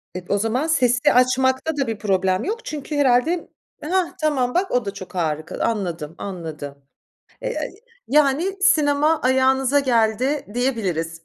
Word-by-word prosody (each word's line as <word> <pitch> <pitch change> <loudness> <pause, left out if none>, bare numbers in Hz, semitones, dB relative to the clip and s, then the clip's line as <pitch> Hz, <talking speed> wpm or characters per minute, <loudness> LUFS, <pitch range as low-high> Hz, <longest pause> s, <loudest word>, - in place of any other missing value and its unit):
Eee, 180 - -6
o 200 - +2
zaman 230 +9 0
sesi 250 -6 +2
de - - +6
açmakta 260 +4 +2
da 275 -3 0
bir 225 - -3
problem 190 -2 +1
yok 455 +4 -4
çünkü 300 0 -5
herhâlde 285 +5 +2 0.4
Hah, 355 +3 0
tamam 265 -5 +1
bak 375 +2 0
o 245 -3 +1
da 200 - -4
çok 185 -1 -10
harika. 160 -2 -2
Anladım, 175 -8 -2
anladım. 160 -7 -7 0.7
Eee, - - -2 0.5
yani, 300 +7 +2
sinema 300 0 +3
ayağınıza 265 +2 +3
geldi 250 +3 +1
diyebiliriz. 185 -10 -2
255 Hz, 145 wpm, -22 LUFS, 195-290 Hz, 0.7 s, de